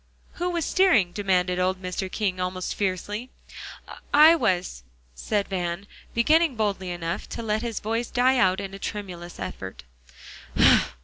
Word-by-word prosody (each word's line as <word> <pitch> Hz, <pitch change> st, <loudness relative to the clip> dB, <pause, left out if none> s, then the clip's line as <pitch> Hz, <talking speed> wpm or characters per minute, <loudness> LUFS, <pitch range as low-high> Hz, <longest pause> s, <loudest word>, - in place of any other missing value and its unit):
"Who 355 Hz, -, +1 dB
was 340 Hz, -3 st, -1 dB
steering?" 330 Hz, -, +3 dB
demanded 180 Hz, -2 st, 0 dB
old 185 Hz, +1 st, 0 dB
Mr. 185 Hz, +1 st, -4 dB
King 195 Hz, -4 st, -1 dB
almost 180 Hz, 0 st, -3 dB
fiercely. 205 Hz, +5 st, -3 dB, 0.8 s
"I 310 Hz, +3 st, +8 dB
was," 185 Hz, -, -1 dB, 0.3 s
said 200 Hz, -, -1 dB
Van, 180 Hz, 0 st, -3 dB, 0.3 s
beginning 310 Hz, +5 st, +3 dB
boldly 200 Hz, -4 st, -1 dB
enough, 175 Hz, +1 st, -4 dB
to 230 Hz, -, -5 dB
let 215 Hz, 0 st, 0 dB
his 235 Hz, -2 st, -3 dB
voice 230 Hz, +2 st, -2 dB
die 255 Hz, +2 st, +3 dB
out 185 Hz, -2 st, +3 dB
in 195 Hz, -1 st, -6 dB
a 195 Hz, -, -8 dB
tremulous 180 Hz, -5 st, -6 dB
effort. -, -, -7 dB
195 Hz, 140 wpm, -25 LUFS, 180-235 Hz, 0.8 s, I